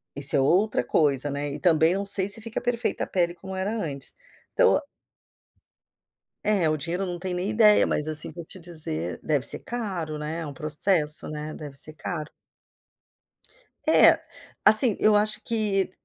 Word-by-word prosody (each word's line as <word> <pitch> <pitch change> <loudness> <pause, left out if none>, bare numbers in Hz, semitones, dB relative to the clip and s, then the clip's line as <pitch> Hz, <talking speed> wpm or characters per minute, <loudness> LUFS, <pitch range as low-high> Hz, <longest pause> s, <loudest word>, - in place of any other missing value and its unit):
isso 140 -1 0
é - - +3
outra 180 - +1
coisa 140 +1 +1
né, 145 +1 -4
e - - -7
também 165 -2 +3
eu 195 - -2
não 200 - -4
sei 195 -1 +3
se 225 - -1
fica 225 0 -5
perfeita 240 -1 -2
a - - -5
pele 175 -2 -1
como 190 +2 -10
era 190 +3 -3
antes. 145 -8 -4 0.4
Então - - +3 1.6
É, 195 -7 +1
o 155 - -1
dinheiro 175 +6 -3
não 175 -1 -5
tenho 180 0 -5
nem 190 +3 -3
ideia, 215 -1 +4
mas 150 - -3
assim 155 -1 -2
vou 170 0 -10
te 185 - -12
dizer, 155 - -2
deve 145 -4 -1
ser - - +2
caro 185 -10 -5
né. 155 +2 -5
É - - -6
um 145 - -8
processo 155 0 0
né, 150 0 -7
deve 145 -3 -10
ser 155 +3 +1
caro. 155 -1 -6 1.6
É, - - +5 0.4
assim, 215 +1 +9
eu 215 -1 +3
acho 210 +1 0
que, 210 -5 -1
170 Hz, 175 wpm, -24 LUFS, 150-200 Hz, 1.6 s, assim